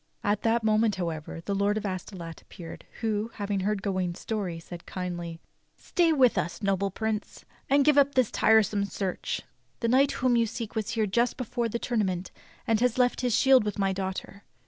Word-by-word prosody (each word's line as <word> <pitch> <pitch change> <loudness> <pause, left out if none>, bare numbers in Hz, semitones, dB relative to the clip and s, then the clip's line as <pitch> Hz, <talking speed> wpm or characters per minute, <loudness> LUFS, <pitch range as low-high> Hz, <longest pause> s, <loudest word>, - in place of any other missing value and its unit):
At 205 0 +1
that 230 0 +2
moment, 215 -1 +3
however, 165 -3 -4
the 200 - -1
Lord 200 +1 +1
of 215 - -3
Astolat 180 -3 -6
ap - - -30
peared, 165 -2 -10 0.2
who, 220 -1 -1
having 205 -1 -2
heard 200 +1 -1
Ga 200 - 0
wain's 180 -2 -2
story, 200 -6 -3
said 170 +1 -10
kindly: 175 -2 -5 0.4
"Stay 345 -3 +2
with 260 -6 +4
us, 170 +6 -4
noble 195 0 +1
Prince, 220 +2 -4 0.2
and 280 0 +4
give 295 -1 +6
up 280 0 +3
this 255 -4 +3
tiresome 215 -2 +3
search. 195 -2 -3 0.4
The 230 - 0
knight 265 +4 +4
whom 250 -1 +2
you 230 -1 +3
seek 225 0 -5
was 220 -1 -2
here 220 - +3
just 235 +5 +1
before 240 -1 -2
the 235 - -2
tournament 190 -7 -1 0.3
and 225 -2 +2 0.2
left 250 0 +2
his 245 -3 +1
shield 265 -1 +6
with 210 -1 -3
my 195 -1 +1
daughter. 190 +1 -5
210 Hz, 190 wpm, -28 LUFS, 190-235 Hz, 0.4 s, give